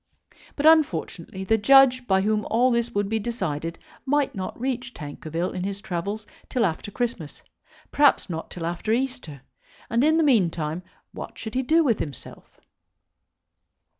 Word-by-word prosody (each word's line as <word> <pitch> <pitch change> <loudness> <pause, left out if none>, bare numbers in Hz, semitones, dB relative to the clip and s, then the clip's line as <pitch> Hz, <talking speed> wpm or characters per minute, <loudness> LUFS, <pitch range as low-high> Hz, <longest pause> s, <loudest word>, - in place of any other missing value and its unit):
But, 290 - -2
unfortunately, 190 - +2
the 220 +3 +2
judge 255 +1 +6
by 190 -1 +3
whom 215 +1 +1
all 245 +3 +3
this 235 0 +1
would 205 -3 -1
be 220 +2 -1
decided 170 -8 -3 0.3
might 285 0 +1
not 190 +3 -5
reach 255 0 -3
Tankerville 160 +3 -4
in 180 - -4
his 200 +1 -3
travels 200 +2 -4 0.2
till 245 -3 +1
after 170 +3 -3
Christmas, 210 - -4 0.5
perhaps 290 -1 +4
not 165 -3 -5
till 170 -2 -6
after 175 +5 -2
Easter; 250 - -3 0.5
and 235 +3 +2
in 315 +2 +4
the 325 - +3
meantime, 175 - +1 0.3
what - - -8
should 220 - -7
he 260 - +1
do 320 +6 +3
with 235 -7 +1
himself? 140 -4 -8
215 Hz, 155 wpm, -25 LUFS, 175-255 Hz, 0.5 s, judge